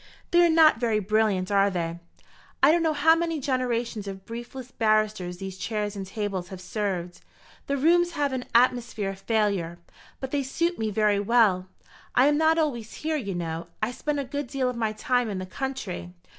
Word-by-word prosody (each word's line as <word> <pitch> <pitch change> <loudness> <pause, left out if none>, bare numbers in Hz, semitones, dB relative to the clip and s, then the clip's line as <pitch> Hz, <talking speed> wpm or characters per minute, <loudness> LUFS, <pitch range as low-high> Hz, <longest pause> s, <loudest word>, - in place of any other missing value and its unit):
"They 345 0 +6
are 340 - +5
not 320 -6 +6
very 230 -3 +1
brilliant, 210 -2 +1
are 200 0 +4
they? 170 -2 -3 0.6
I - - +8
don't 340 +1 +3
know 325 -1 +2
how 305 +2 +5
many 330 -1 -1
generations 245 -5 -1
of 190 -1 -7
briefless 240 +2 -8
barristers 215 -5 +1
these 190 0 -7
chairs 210 -2 -2
and 195 -1 -5
tables 195 -3 -3
have 190 0 -9
served. 185 -3 -3 0.5
The 280 - 0
rooms 345 +4 +3
have 285 -4 0
an 255 -1 -3
atmosphere 235 -4 +2
of 195 - -10
failure; 200 -6 0 0.4
but 265 -1 -5
they 285 - +1
suit 335 +6 -1
me 220 -1 0
very 210 -1 +2
well. 200 -4 +3 0.5
I 250 - +6
am 295 +1 +4
not 320 +1 +3
always 240 -9 -1
here, 315 +1 -2
you 200 -10 -3
know. 165 -1 -4
I 215 +3 -1
spend 290 +3 -2
a - - -1
good 285 +1 -4
deal 255 0 -1
of - - -9
my 225 -2 0
time 245 +1 0
in 200 - -3
the 185 - -4
country." 185 - -5
225 Hz, 195 wpm, -26 LUFS, 195-275 Hz, 0.6 s, I